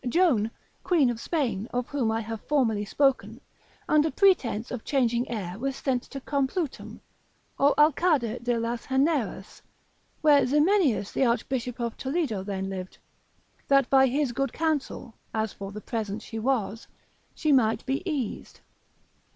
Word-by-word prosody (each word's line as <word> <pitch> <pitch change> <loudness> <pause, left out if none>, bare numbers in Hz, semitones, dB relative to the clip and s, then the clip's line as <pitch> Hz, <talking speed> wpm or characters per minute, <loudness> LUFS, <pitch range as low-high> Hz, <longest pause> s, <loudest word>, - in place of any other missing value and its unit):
Joan, 250 - +3 0.3
queen 300 -9 +3
of 230 - -6
Spain, 235 - -2
of 245 0 -2
whom 265 -6 0
I 225 +1 -1
have 225 0 -6
formerly 225 -8 +1
spoken, 270 +5 +1 0.5
under 305 +1 +3
pretence 260 - +2
of 250 -3 -5
changing 245 -3 0
air 195 -4 -4
was 270 +2 -2
sent 260 -3 -1
to 275 - -9
Complutum, 280 +3 -3 0.6
or 285 +1 +4
Alcada 295 -6 +3
de 240 -1 +1
las 230 +1 -3
Heneras, 265 - -1 0.6
where 295 -2 +5
Ximenius 295 - +2
the 270 - +1
archbishop 250 +1 -2
of 235 -1 -3
Toledo 265 - -2
then 195 -1 -3
lived, 185 -1 -6 0.7
that 275 -2 +3
by 265 -1 +6
his 275 0 0
good 275 +3 -1
counsel 300 -6 -2 0.2
(as 220 -1 -1
for 195 0 -7
the 210 +1 -8
present 215 -2 -4
she 225 - -6
was) 225 -3 -1 0.5
she 310 - 0
might 225 -5 +3
be 270 +4 -1
eased. 265 -8 -4
255 Hz, 145 wpm, -27 LUFS, 225-285 Hz, 0.7 s, by